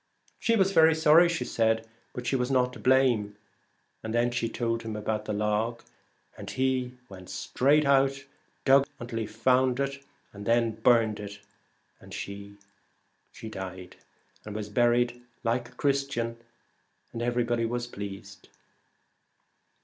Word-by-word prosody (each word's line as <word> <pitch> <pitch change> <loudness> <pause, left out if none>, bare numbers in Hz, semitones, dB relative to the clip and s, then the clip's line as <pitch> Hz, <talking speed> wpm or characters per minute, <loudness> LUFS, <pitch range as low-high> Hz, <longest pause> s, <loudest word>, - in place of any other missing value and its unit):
She 230 - +2
was 195 -2 +3
very 160 -3 +6
sorry, 160 +2 +6
she 170 -1 -2
said, 110 0 +1 0.2
but 125 - -7
she 135 - 0
was 125 -1 0
not 125 -2 +2
to - - -10
blame, 125 -6 +2 0.6
and 110 +1 -4
then 120 +1 +2
she 120 -1 -1
told 115 0 -2
him 110 -1 -5
about 105 0 -2
the 105 - -3
log, 105 +3 -1 0.5
and - - -8
he 130 -1 -1
went 95 -2 -12
straight 145 +4 +2
out 135 -1 +4
and 135 0 -11 0.4
dug 135 +1 +5
until 120 -1 -5
he 110 - -3
found 125 +3 +2
it, 140 0 -2 0.3
and 100 0 -9
then 115 -1 +2
they 110 - -18
burned 115 -3 +4
it, 100 0 -7 0.6
and - - -11
she 100 0 -7 0.9
died, 95 -3 -8 0.5
and 105 -1 -8
was 105 -1 -4
buried 120 +2 +2 0.2
like 120 +1 -1
a - - -20
Christian, 135 -5 -1 0.8
and 115 - -4
everybody 120 -1 0
was 120 +1 -2
pleased. 100 -4 -9
120 Hz, 150 wpm, -28 LUFS, 110-130 Hz, 0.9 s, very